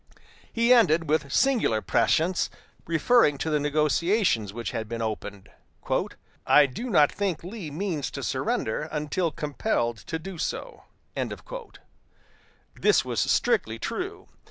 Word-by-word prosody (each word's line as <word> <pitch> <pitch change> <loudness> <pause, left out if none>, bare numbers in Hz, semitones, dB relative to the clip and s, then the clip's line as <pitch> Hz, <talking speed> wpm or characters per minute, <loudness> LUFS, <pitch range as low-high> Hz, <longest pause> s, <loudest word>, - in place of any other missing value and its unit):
He 235 +2 +4
added, 165 -9 +4
with 145 -2 0
singular 240 - +2
prescience, 160 +12 +1 0.4
referring 165 -1 +3
to 160 +4 -2
the 150 - +2
negotiations 150 - +1
which 115 +2 -5
had 110 -1 -4
been 115 0 -4
opened: 105 -3 -5 1.0
"I 150 - +7
do 230 - -5
not 150 -9 +5
think 195 -6 -2
Lee 185 -2 -6
means 155 - -3
to - - -5
surrender 150 +8 -1
until 155 +3 -1
compelled 145 - -1
to 160 - -5
do 170 +1 -8
so." - - -4 1.9
This - - +3
was - - -2
strictly - - +1
true. 395 +3 -5
155 Hz, 125 wpm, -26 LUFS, 135-195 Hz, 1.9 s, I